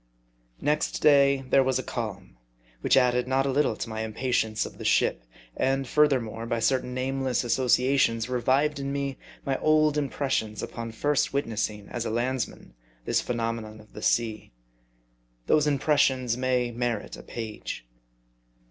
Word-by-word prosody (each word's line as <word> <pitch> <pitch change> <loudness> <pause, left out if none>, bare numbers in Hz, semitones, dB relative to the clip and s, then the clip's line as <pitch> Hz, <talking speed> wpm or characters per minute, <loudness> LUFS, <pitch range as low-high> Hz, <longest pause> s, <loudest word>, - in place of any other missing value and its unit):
NEXT 150 +2 0
day 140 -2 +5
there 135 - +6
was 130 -1 +1
a 130 - -3
calm, 100 - -5 0.4
which - - +3
added 125 -1 +3
not 135 +1 +1
a 135 - +1
little 135 -4 +2
to - - -5
my 110 -1 -4
impatience 110 -1 -1
of - - -10
the - - -6
ship. - - +2 0.3
And, 135 0 0
furthermore, 120 -6 +1
by 115 - 0
certain 125 +1 0
nameless 130 0 -1
associations 125 -1 +2
revived 135 +4 +1
in 140 0 -3
me 140 -1 -3 0.3
my 135 -1 -1
old 155 -1 +3
impressions 135 -6 -2
upon 115 -1 -5
first 145 +6 0
witnessing 110 -6 -2
as 120 - -3
a - - -3
landsman 120 - -3 0.3
this - - +1
phenomenon 115 -2 -3
of 110 0 -18
the 105 - -8
sea. 110 -2 0 0.9
Those 150 -1 +3
impressions 135 -4 +2
may 125 -1 0
merit 120 -2 -3
a - - -10
page. 110 - -6
125 Hz, 150 wpm, -27 LUFS, 115-135 Hz, 0.9 s, there